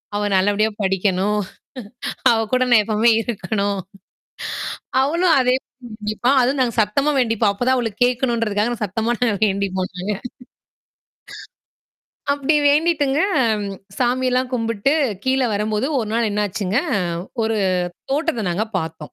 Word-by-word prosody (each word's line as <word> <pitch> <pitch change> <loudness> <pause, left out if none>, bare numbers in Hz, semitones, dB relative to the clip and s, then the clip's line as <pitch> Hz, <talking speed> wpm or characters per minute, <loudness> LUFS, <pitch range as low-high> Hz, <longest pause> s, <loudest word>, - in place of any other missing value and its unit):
அவ 205 0 0
நல்லபடியா 205 +3 +2
படிக்கணும். 195 +2 +1 0.9
அவ 230 - +3
கூட 255 0 +3
நான் 230 -3 +6
எப்பவுமே 220 +2 +3
இருக்கணும்" 205 -3 -2 1.2
அவளும் 335 +5 +2
அதே 250 0 +3
தான் - - -75 0.3
வேண்டிப்பா 215 +3 -1
அதும் 260 +3 +1
நாங்க 245 -2 +1
சத்தமா 275 +8 +1
வேண்டிப்போம். 225 -4 +2
அப்பத் 245 +5 -3
தான் 260 - +4
அவளுக்குக் 230 -1 -1
கேக்கணும்ன்றதுக்காக 235 -3 0
நான் 225 - -4
சத்தமா 220 +4 -1
நாங்க 230 -4 +2
வேண்டிப்போம் 190 -2 -1
நாங்க. 190 +4 -2 2.2
அப்படி 285 +2 +1
வேண்டிட்டுங்க, 295 -2 +2 0.8
சாமி 255 +1 +1
எல்லாம் 250 0 0
கும்பிட்டு, 230 +2 0 0.3
கீழ 265 +1 +2
வரும்போது 210 +3 -1
1 220 -4 -2
நாள் 230 -1 +1
என்னாச்சுங்க? 205 0 -1 0.7
ஒரு 220 0 0 0.5
தோட்டத்தை 295 -6 0
நாங்க 200 +6 -1
பாத்தோம். 160 -1 -5
225 Hz, 120 wpm, -20 LUFS, 205-255 Hz, 2.2 s, நான்